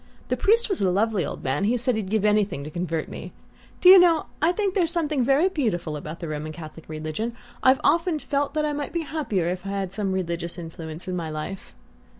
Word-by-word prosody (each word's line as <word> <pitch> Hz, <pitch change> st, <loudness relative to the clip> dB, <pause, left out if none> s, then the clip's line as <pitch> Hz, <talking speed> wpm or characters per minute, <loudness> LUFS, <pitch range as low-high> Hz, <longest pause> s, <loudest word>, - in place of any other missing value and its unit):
The -, -, +2 dB
priest 460 Hz, +3 st, +3 dB
was 390 Hz, -4 st, -1 dB
a 190 Hz, -, +3 dB
lovely 205 Hz, 0 st, +1 dB
old -, -, -6 dB
man 135 Hz, +9 st, 0 dB
he 240 Hz, +4 st, +2 dB
said 245 Hz, 0 st, +1 dB
he'd 210 Hz, -4 st, -3 dB
give 215 Hz, 0 st, +1 dB
anything 210 Hz, -8 st, +2 dB
to 150 Hz, -, -7 dB
convert 165 Hz, -2 st, -2 dB
me. -, -, -8 dB, 0.5 s
Do -, -, +5 dB
you 380 Hz, 0 st, +11 dB
know, 335 Hz, -3 st, +4 dB, 0.2 s
I 325 Hz, +3 st, +4 dB
think 395 Hz, 0 st, -1 dB
there's 355 Hz, -4 st, +2 dB
something 310 Hz, -5 st, +1 dB
very 275 Hz, +8 st, +4 dB
beautiful 215 Hz, -, -1 dB
about 155 Hz, +3 st, -7 dB
the 170 Hz, -, -4 dB
Roman 155 Hz, 0 st, -4 dB
Catholic 155 Hz, 0 st, -10 dB
religion? 155 Hz, +9 st, -4 dB, 0.3 s
I've 260 Hz, +1 st, +5 dB
often 335 Hz, -1 st, +2 dB
felt 285 Hz, 0 st, -2 dB
I 300 Hz, -1 st, +1 dB
might 290 Hz, 0 st, -2 dB
have -, -, -13 dB
been 340 Hz, -1 st, -1 dB
happier 280 Hz, -, -1 dB
if 180 Hz, +1 st, -3 dB
I'd 195 Hz, -, -5 dB
had 195 Hz, -2 st, -3 dB
some 200 Hz, -1 st, -1 dB
religious 170 Hz, -2 st, -3 dB
influence 165 Hz, 0 st, -7 dB
in 185 Hz, -, -2 dB
my 165 Hz, -3 st, -3 dB
life." 155 Hz, +5 st, -6 dB
205 Hz, 225 wpm, -25 LUFS, -, 0.5 s, you